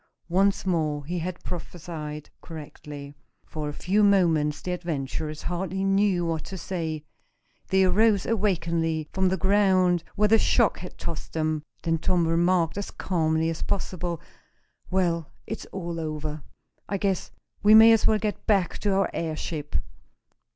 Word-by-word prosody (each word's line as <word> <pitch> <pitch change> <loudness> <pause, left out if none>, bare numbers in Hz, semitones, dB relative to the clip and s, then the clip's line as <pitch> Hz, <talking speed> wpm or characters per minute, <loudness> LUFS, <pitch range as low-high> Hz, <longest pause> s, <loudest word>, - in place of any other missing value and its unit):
Once 195 +3 +2
more 155 -5 0
he 175 +3 -2
had 180 +2 -5
prophesied 160 -3 -6
correctly. 145 -3 -9 0.3
For 150 -1 -4
a - - -5
few 200 +7 +1
minutes 165 -7 +3
the 180 - -2
adventurers 155 -3 -3
hardly 190 +2 -2
knew 195 -2 +2
what 165 -2 -2
to 190 - -6
say. 160 -5 -4 0.6
They 190 0 +3
arose 200 +2 +3
awkwardly 165 -7 0
from 190 -1 +2
the 190 - 0
ground 185 -2 +3
where 210 +1 +3
the 225 +1 +5
shock 235 -1 +3
had 180 - -9
tossed 165 -2 -6
them. 155 -1 0 0.2
Then 165 -1 +1
Tom 175 0 +2
remarked, 170 +2 +2
as 200 - -4
calmly 160 -3 0
as 165 - -6
possible: 175 -3 -2 0.7
"Well, 170 -4 0 0.2
it's 220 - -6
all 170 -3 -5
over. 155 -1 -4 0.5
I 200 - 0
guess 195 -2 -1 0.3
we 210 +1 +7
may 225 +1 +9
as 225 -2 +4
well 215 - +4
get 210 0 -3
back 195 -5 +2
to 205 -2 +1
our 195 - +2
airship." 155 -2 -4
175 Hz, 150 wpm, -26 LUFS, 160-195 Hz, 0.7 s, may